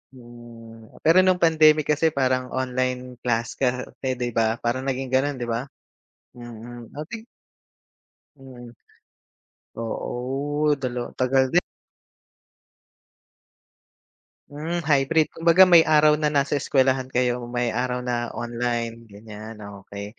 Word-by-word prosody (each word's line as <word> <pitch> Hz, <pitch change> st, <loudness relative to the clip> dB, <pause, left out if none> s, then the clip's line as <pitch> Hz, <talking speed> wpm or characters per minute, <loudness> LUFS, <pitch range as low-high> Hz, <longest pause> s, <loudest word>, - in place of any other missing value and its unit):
Mm, 120 Hz, -2 st, -14 dB
pero 165 Hz, +3 st, +6 dB
nung 185 Hz, -1 st, +2 dB
pandemic 155 Hz, -2 st, +4 dB
kasi 160 Hz, +1 st, +1 dB
parang 130 Hz, -1 st, +1 dB
online 125 Hz, -1 st, -2 dB
class 115 Hz, -1 st, -2 dB
kasi 125 Hz, -1 st, -1 dB, 0.3 s
di 125 Hz, -1 st, -3 dB
ba, 110 Hz, 0 st, +1 dB
parang 130 Hz, +3 st, -2 dB
naging 135 Hz, 0 st, -2 dB
ganun, 135 Hz, +2 st, +1 dB
di 120 Hz, -, -3 dB
ba? 115 Hz, +3 st, -2 dB, 0.7 s
Mm, 120 Hz, 0 st, -10 dB
okey. 210 Hz, +10 st, -8 dB, 1.1 s
Mm. 125 Hz, -3 st, -12 dB, 1.1 s
Oo, 135 Hz, +6 st, -2 dB
dalawa 125 Hz, -1 st, -4 dB
tagal 130 Hz, +1 st, +1 dB
din. 175 Hz, -, +5 dB, 2.9 s
Hmm, 160 Hz, +4 st, -4 dB
hybrid. 150 Hz, +1 st, +2 dB
Kumbaga, 170 Hz, +3 st, +4 dB
may 175 Hz, -3 st, +7 dB
araw 150 Hz, -1 st, +4 dB
na 155 Hz, -, 0 dB
nasa 145 Hz, -1 st, +1 dB
eskwelahan 130 Hz, -1 st, +1 dB
kayo, 125 Hz, -1 st, -1 dB
may 120 Hz, -1 st, -1 dB
araw 125 Hz, +2 st, -2 dB
na 120 Hz, -1 st, -2 dB
online, 120 Hz, -1 st, -3 dB
ganyan, 110 Hz, +1 st, -11 dB, 0.3 s
okey. 100 Hz, +2 st, -9 dB
125 Hz, 115 wpm, -23 LUFS, 120-145 Hz, 2.9 s, may